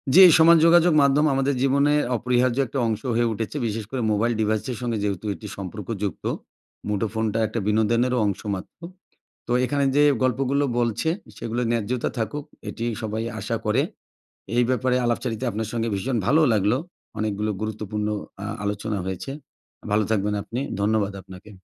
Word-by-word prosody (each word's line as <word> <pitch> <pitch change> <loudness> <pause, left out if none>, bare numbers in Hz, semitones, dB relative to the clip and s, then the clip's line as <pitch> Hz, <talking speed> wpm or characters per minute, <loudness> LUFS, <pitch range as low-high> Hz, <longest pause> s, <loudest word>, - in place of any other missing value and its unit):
জি, 190 - +10 0.2
সমাজ 165 +1 +8
যোগাযোগ 170 0 +6
মাধ্যম 140 +2 +4
আমাদের 135 +1 +1
জীবনে 140 +2 +3 0.2
অপরিহার্য 125 +1 +1
একটা 135 - -3
অংশ 110 -2 -2
হয়ে 120 0 +2
উঠেছে। 110 +7 -4
বিশেষ 110 -1 -3
করে 130 -2 -2
মোবাইল 115 +3 +1
ডিভাইসের 110 +3 -1
সঙ্গে 120 -3 -1
যেহেতু 100 -1 -2
এটি 105 - -9
সম্পর্কযুক্ত। 100 0 -5 0.6
মুঠোফোনটা 110 +1 -1
একটা 115 +2 -3
বিনোদনেরও 115 +4 +2
অংশ 100 -2 -1
মাত্র। 95 - -10 0.7
তো, - - -2
এখানে 140 +2 0
যে 145 - +6 0.2
গল্পগুলো 135 +2 +1
বলছে, 120 +5 0 0.3
সেগুলা 120 +2 -3
ন্যায্যতা 115 +1 -1
থাকুক, 145 +6 -3 0.2
এটিই 115 0 -3
সবাই 110 +1 -2 0.2
আশা - - -2
করে। - - +3 0.7
এই 120 - +4
ব্যাপারে 130 0 +1
আলাপচারিতায় 120 0 -1
আপনার 110 0 -3
সঙ্গে 115 -1 -1
ভীষণ 120 +6 -1
ভালোও 155 +5 +4
লাগলো। 105 +3 +2 0.4
অনেকগুলো 105 0 -1
গুরুত্বপূর্ণ 105 -1 -3 0.4
আ - - -3 0.2
আলোচনা 105 +1 -2
হয়েছে। 95 +7 -4 0.6
ভালো 105 +1 +3
থাকবেন 105 -1 +1
আপনি, 120 +5 -5 0.2
ধন্যবাদ 105 -1 +1
আপনাকে। 95 +2 -13
115 Hz, 150 wpm, -24 LUFS, 105-130 Hz, 0.7 s, জি